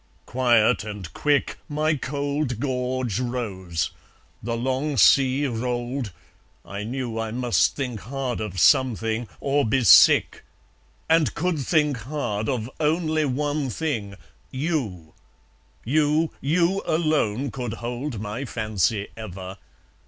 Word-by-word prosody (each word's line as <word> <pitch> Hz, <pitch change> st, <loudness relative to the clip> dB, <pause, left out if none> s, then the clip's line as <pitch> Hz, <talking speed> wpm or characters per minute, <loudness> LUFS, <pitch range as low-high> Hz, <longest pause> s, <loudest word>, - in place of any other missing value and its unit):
Quiet 120 Hz, -5 st, +3 dB
and 105 Hz, -5 st, -7 dB
quick 145 Hz, -1 st, 0 dB
My 155 Hz, +1 st, +1 dB
cold 140 Hz, -3 st, -2 dB
gorge 125 Hz, -4 st, -1 dB
rose; 100 Hz, -10 st, -3 dB, 0.5 s
the 115 Hz, +1 st, -3 dB
long 130 Hz, +4 st, -1 dB
sea 135 Hz, +4 st, +5 dB
rolled; 120 Hz, -1 st, -2 dB, 0.5 s
I 100 Hz, +1 st, -6 dB
knew 120 Hz, 0 st, -4 dB
I 115 Hz, 0 st, -2 dB
must 120 Hz, +1 st, +1 dB
think 125 Hz, -6 st, -3 dB
hard 130 Hz, 0 st, -4 dB
of 100 Hz, -4 st, -4 dB
something, 115 Hz, +3 st, +3 dB
or 140 Hz, +1 st, +1 dB
be 130 Hz, +2 st, +1 dB
sick; 105 Hz, -, +6 dB, 0.6 s
And 160 Hz, -6 st, +3 dB
could 175 Hz, 0 st, 0 dB
think 150 Hz, -1 st, +1 dB
hard 115 Hz, -4 st, -3 dB
of 120 Hz, -4 st, -1 dB
only 155 Hz, 0 st, +1 dB
one 145 Hz, +1 st, -1 dB
thing 115 Hz, -8 st, -3 dB, 0.3 s
YOU! 130 Hz, -, -3 dB, 0.7 s
You, 155 Hz, +4 st, +2 dB
you 175 Hz, +6 st, +2 dB
alone 145 Hz, -6 st, +1 dB
could 125 Hz, -3 st, -4 dB
hold 120 Hz, +2 st, -4 dB
my 105 Hz, +5 st, -4 dB
fancy 110 Hz, -3 st, -1 dB
ever! 95 Hz, -3 st, -8 dB
125 Hz, 115 wpm, -24 LUFS, 110-145 Hz, 0.7 s, sick